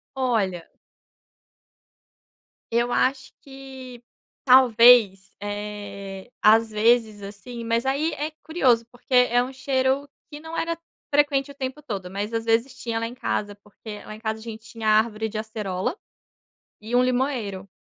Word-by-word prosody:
Olha 210 -10 0 2.1
eu 235 +1 +1
acho 265 +1 0
que 265 -3 -11 0.4
talvez, 235 -6 +6
eh, 205 -1 -6
às 225 +1 +5
vezes 220 -1 +2
assim, 220 +4 -8
mas 230 +2 0
aí 285 +5 0
é 300 +2 -3
curioso, 255 -8 +2
porque 245 +2 -10
é 245 -1 +5
um 260 +1 -7
cheiro 265 +1 0 0.2
que 295 - -9
não 320 +1 -7
era 335 0 -1 0.4
frequente 285 -1 +2
o - - -11
tempo 265 +1 -5
todo, 195 -9 -5
mas 205 +3 -4
às 225 0 -1
vezes 230 +4 +1
tinha 230 -3 -3
lá 230 - -2
em 240 - -9
casa, 205 -4 -2
porque 210 +1 -11
lá 215 - -9
em 215 - -13
casa 220 -1 -3
a - - -13
gente 225 -1 -9
tinha 225 -1 -6
árvore 220 0 +2
de 215 - -6
acerola, 215 - -3 0.8
e 225 +3 -2
um 250 - +5
limoeiro. 245 -7 -1
230 Hz, 150 wpm, -24 LUFS, 210-260 Hz, 2.1 s, talvez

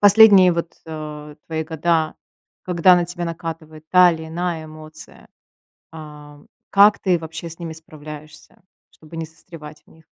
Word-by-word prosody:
Последние 205 -3 +7
вот, 170 0 -4
э, 150 -1 -8
твои 160 -1 -3
года, 160 0 0 0.5
когда 180 0 +4
на 175 - +1
тебя 175 0 -5
накатывает 165 -2 -7
та 180 -1 +7
или 160 -1 -7
иная 170 -1 -3
эмоция, 155 0 -13 0.6
ам, 150 -2 -12 0.2
как 205 +1 +6
ты 180 -3 +1
вообще 165 +1 -8
с 165 - -10
ними 165 -2 -6
справляешься, 155 -1 -13 0.3
чтобы 160 +1 -14
не 165 -1 -4
застревать 155 -2 -13
в - - -24
них? 160 0 -21
160 Hz, 145 wpm, -20 LUFS, 155-175 Hz, 0.6 s, Последние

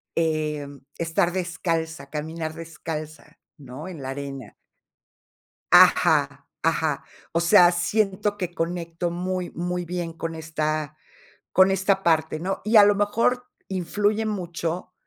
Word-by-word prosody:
Em, 150 -3 -1 0.2
estar 170 +1 +1
descalza, 165 -2 -3
caminar 155 +1 -4
descalza, 155 -2 -7 0.2
¿no?, 140 +3 -9
en 170 -6 -8
la 130 - -5
arena. 135 -3 -6 1.2
Ajá, - - +5
ajá. - - 0 0.3
O 165 - +1
sea, 175 +1 +6
siento 205 +3 0
que 180 -3 -4
conecto 170 0 -3
muy, 180 0 -3
muy 180 +1 -3
bien 175 -1 -4
con 165 0 -5
esta 155 -1 -3 0.6
con 190 +1 +6
esta 195 0 +1
parte, 160 -2 +2
¿no?, 190 +4 -3
y 220 +2 +3
a 205 - +10
lo 205 - +5
mejor 230 +5 +1 0.2
influye 205 +4 0
mucho 175 -3 -3
170 Hz, 125 wpm, -24 LUFS, 155-185 Hz, 1.2 s, a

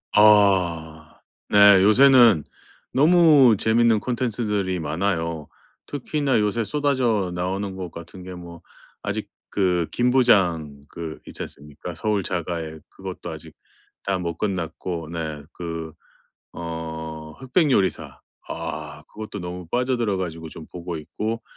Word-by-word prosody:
아. 90 -7 +3 0.3
네. 100 -2 +7
요새는 115 - +6 0.5
너무 150 -5 +6
재밌는 115 0 +3
콘텐츠들이 105 -7 -1
많아요. 80 -1 -2 0.4
특히나 145 -2 0
요새 105 +2 0
쏟아져 125 -9 0
나오는 95 +2 -2
것 90 -2 -5
같은 85 +2 -10
게 90 0 -8
뭐 85 -1 -10 0.4
아직 - - -3 0.2
그 90 -4 +1
김부장 95 - +2
그 80 -2 -7
있지 - - -8
않습니까? 75 +4 -9
서울 105 +3 0
자가의 85 -3 -4
그것도 95 -3 -8
아직 80 -1 -9 0.5
다 95 -1 -1
못 85 -2 -4
끝났고 85 -4 -3
네 80 -3 -5
그 85 -2 -6 0.6
어 80 -2 -6
흑백 140 +4 +1
요리사 95 - 0 0.3
아 75 -2 -6
그것도 110 -1 -8
너무 90 -1 -7
빠져들어 120 -3 0
가지고 80 -3 -5
좀 80 - -10
보고 85 -1 -5
있고 110 +9 -4
90 Hz, 245 characters per minute, -23 LUFS, 80-110 Hz, 0.6 s, 네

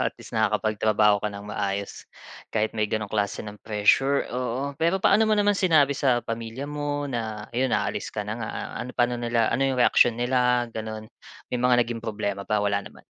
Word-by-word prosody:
at - - 0
least, - - -11
nakakapagtrabaho 105 -1 +2
ka 105 - 0
ng 100 0 -9
maayos, 100 -1 -3 0.5
kahit 110 0 -1
may 105 -1 -1
gano'ng 110 -1 -1
klase 100 -1 -1
ng 105 0 -9
pressure, 115 +6 +2
oo. 130 +3 -2
Pero 170 +6 +1
paano 220 +3 +4
mo 215 - +5
naman 205 0 +3
sinabi 155 -7 +3
sa 135 -3 +2
pamilya 115 +4 -5
mo, 145 0 -3
na 110 -5 -4
'yon 130 +1 +1
aalis 105 -2 -1
ka 105 -1 -4
na 105 - -3
nga, 115 -2 -5 0.3
ano, 125 - -7
pa'no 120 0 +3
nila, 120 -1 0
ano 130 +3 0
yung 135 -1 +1
reaksiyon 120 -1 +4
nila, 125 0 +2
gano'n? 110 -1 -5 0.5
May 125 - 0
mga 125 0 +4
naging 115 -1 -5
problema 100 -3 -3
ba, 105 +1 0
wala 100 0 0
naman? - - -14
115 Hz, 190 wpm, -25 LUFS, 105-130 Hz, 0.5 s, mo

